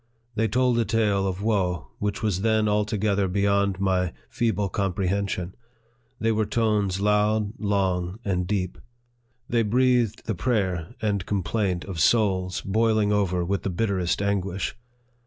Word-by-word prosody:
They 110 0 +1
told 125 +2 +2
a - - +3
tale 105 -2 +1
of 95 +1 -3
woe 90 -7 0
which 105 +1 -2
was 100 -4 0
then 110 0 +2
altogether 105 -1 +1
beyond 100 0 +1
my 95 -2 +1 0.2
feeble 110 -4 0
comprehension; 95 -1 -1 0.7
they 115 0 +1
were 110 -1 0
tones 105 -4 +1
loud, 105 +1 +2
long, 95 -3 0
and 90 -3 0
deep; 95 -3 -2 0.7
they 120 -1 +2
breathed 120 0 +2
the 110 - -1
prayer 95 -2 -1
and 100 -3 0
complaint 95 -2 -1
of 95 -4 -5
souls 95 -3 +2
boiling 110 0 +2
over 90 -4 +1
with 100 +2 -1
the - - -2
bitterest 95 -1 0
anguish. 100 -2 -1
100 Hz, 140 wpm, -25 LUFS, 95-110 Hz, 0.7 s, a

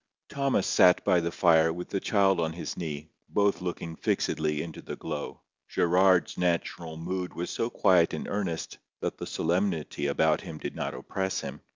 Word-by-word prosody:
Thomas 140 -7 +1
sat 90 0 +5
by 90 - +4
the 85 0 -2
fire 80 -2 +4
with 90 +2 -6
the 100 - -1
child 95 -2 +3
on 80 -1 0
his 85 - -5
knee, 80 -2 -5 0.2
both 100 -2 +2
looking 85 -2 -4
fixedly 75 -2 0
into 80 -2 -8
the - - -6
glow. - - -6 0.3
Gerard's 90 +1 +3
natural 85 -2 -1
mood 90 +2 -4
was 85 - -3
so 115 - -1
quiet 90 -7 +4
and 80 - -4
earnest, 95 -5 -3 0.2
that - - -3
the - - -5
solemnity 85 -4 -1
about 80 +2 +2
him 80 -5 -8
did - - -6
not - - -3
oppress 95 0 -3
him. - - -7
85 Hz, 175 wpm, -28 LUFS, 80-95 Hz, 0.3 s, sat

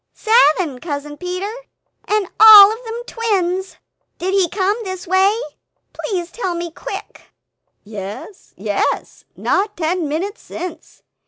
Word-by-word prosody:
"Seven, 360 - +3
Cousin 295 -1 -5
Peter, 365 +5 -4 0.5
and 420 -2 0
all 425 -1 +10
of 460 +3 -10
them 460 +1 -6
twins! 385 -6 -2 0.4
Did 375 +2 -2
he 380 -3 +2
come 390 +2 0
this 375 -2 -6
way? 380 +4 +3 0.6
Please 355 -5 -4
tell 375 -7 -3
me 340 0 -5
quick!" - - -9 0.5
"Yes, 210 - -9
yes; - - -2
not 405 +2 -1
ten 335 0 -1
minutes 375 +9 -4
since 345 -2 -9
375 Hz, 120 wpm, -18 LUFS, 340-415 Hz, 0.6 s, all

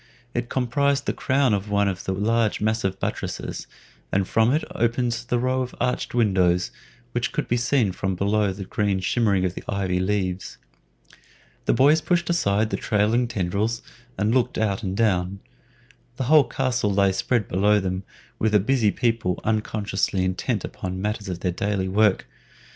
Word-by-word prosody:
It 120 0 -2
comprised 135 +2 +1
the - - 0
crown 135 -3 +1
of 100 +1 -2
one 100 0 +2
of 95 -2 -3
the - - -1
large 110 +3 +1
massive 105 -3 -1
buttresses, - - -4 0.4
and 95 -1 +1
from 115 +2 +3
it 150 +3 +1
opened 120 +1 +1 0.2
the 120 - +1
row 130 +2 0
of 125 -1 -5
arched 125 -1 -1
windows 95 -6 +2 0.4
which 120 -3 -1
could - - -2
be 120 - +1
seen 120 -3 +2
from 95 +1 -2
below 105 +3 +1
through 95 - -1
the 95 0 -7
green 100 0 0
shimmering 100 -2 +1
of 90 - -1
the - - -8
ivy 95 -3 0
leaves. 95 -1 -2 1.1
The - - +2
boys 150 +4 +5
pushed 175 +2 +1
aside 110 -9 +1
the - - 0
trailing 110 +4 +1
tendrils 105 +2 -1 0.3
and 105 +2 +1
looked 125 -2 +1
out 105 -2 0
and 95 -2 -3
down. 95 -3 +1 0.8
The 130 - -2
whole 150 +2 +6
castle 125 -5 0
lay 100 0 +3
spread 105 +4 0
below 105 +3 +3
them, 95 -1 -2 0.4
with 110 -1 +1
the 105 - +6
busy 115 +1 +2
people 115 -5 0
unconsciously 105 -3 -1
intent 95 0 -1
upon 90 -1 -5
the 95 - -5
matters 105 0 -3
of 90 -1 -5
their 90 - 0
daily 95 +1 -1
work. 105 +1 +2
105 Hz, 175 wpm, -24 LUFS, 95-120 Hz, 1.1 s, whole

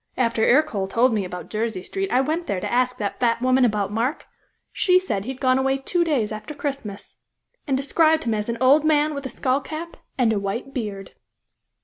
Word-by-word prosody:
After 230 -3 +1
Ercole 240 -8 +2
told 235 +5 +2
me 205 -3 0
about 180 0 -8
Jersey 220 -3 -2
Street 390 - -3
I 255 - +4
went 320 +5 -2
there 195 - -1
to - - -4
ask 250 0 +1
that 205 -3 -4
fat 235 -2 +2
woman 255 +1 +3
about 210 -4 +1
Mark; 235 +7 -1 0.5
she 365 -2 +3
said 205 - -2
he 260 - -3
had 265 - -9
gone 260 -1 +3
away 270 0 +1
two 345 +6 0
days 270 -11 0
after 215 +8 -7
Christmas, 270 -9 -6 0.5
and 270 -2 +1
described 315 +3 +2
him 230 - 0
as 210 +1 -2
an 235 - -2
old 275 +4 +5
man 305 0 +2
with 280 -2 -5
a - - -9
skull 260 +2 0
cap 320 +4 -7 0.2
and 235 -4 +3
a 205 - 0
white 215 +7 -4
beard." 205 -5 -5
255 Hz, 215 wpm, -23 LUFS, 215-285 Hz, 0.5 s, old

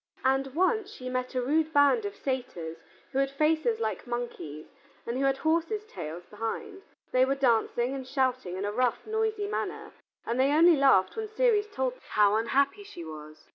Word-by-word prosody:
And 270 +1 +1
once 400 +4 +2
she 255 -10 -7
met 255 +1 -3
a 250 - +1
rude 310 +4 +1
band 285 +10 +4
of 405 0 -4
satyrs 245 -12 -4 0.3
who 270 - 0
had 275 0 +2
faces 285 -5 +1
like 220 -2 -3
monkeys 235 -11 -5 0.4
and 235 - -3
who 275 - +1
had 270 0 +2
horses' 335 +8 0
tails 170 - -7
behind; 225 - -5 0.3
they 255 0 +4
were 270 +1 +2
dancing 240 -1 +1
and 265 -2 -6
shouting 255 -9 -1
in 195 - -2
a 205 - -1
rough, 245 +2 0
noisy 440 -1 -1
manner, 415 - -4 0.3
and 235 +2 -1
they 275 +2 +4
only 335 +2 +7
laughed 270 -10 +4
when 440 -1 -4
Ceres 435 -2 +2
told 260 -7 -1
them - - -20
how 210 -1 +4
unhappy 275 - +1
she 170 - -9
was. 155 0 -10
265 Hz, 185 wpm, -28 LUFS, 230-320 Hz, 0.4 s, only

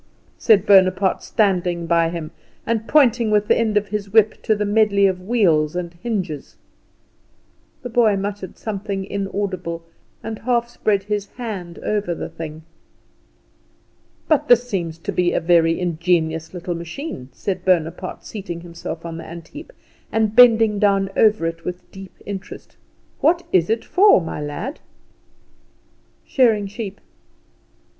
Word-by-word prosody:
said 210 -4 +4
Bonaparte, 190 -1 +4
standing 180 -5 0
by 165 0 +2
him, 165 -2 -6 0.3
and 225 -1 -1
pointing 245 -6 +4
with 210 -1 +2
the - - +4
end 220 -2 +1
of 210 0 0
his 205 -1 -3
whip 220 0 +3
to 215 - +1
the 210 0 -1
medley 205 -1 +3
of 185 -1 0
wheels 180 -8 +2
and 175 -1 -4
hinges. 185 - -4 1.3
The 245 - -5
boy 230 -3 +3
muttered 200 -1 -5
something 200 -2 -4
inaudible, 190 -4 -4 0.4
and 220 -1 -5
half 235 0 0
spread 205 -4 0
over 205 -3 -3
the - - -6
thing. 160 -1 -8 1.6
"But 310 -3 +2
this 245 0 +5
seems 170 -8 -3
to 165 - -5
be 175 -1 +1
a - - +2
very 165 -1 +3
ingenious 165 -2 0
little 180 0 -4
machine," 170 - -7
said 190 +8 -4
Bonaparte, 180 0 -1
seating 185 -5 -6
himself 170 0 -7
on 165 -1 -6
the 165 - -7
antheap, 170 - -10 0.4
and 220 -1 0
bending 225 -4 +6
down 195 -2 +2
over 215 -6 +3
it 165 0 -4
with 180 0 -7
deep 195 -1 -11
interest. 195 -1 -8 0.4
"What 340 +3 +2
is 175 -1 +3
it 225 +1 0
for, 400 - +5
my 165 -3 -5
lad?" 150 - -5 1.5
"Shearing 225 -6 +2
sheep." 205 0 -7
195 Hz, 135 wpm, -21 LUFS, 170-220 Hz, 1.6 s, bending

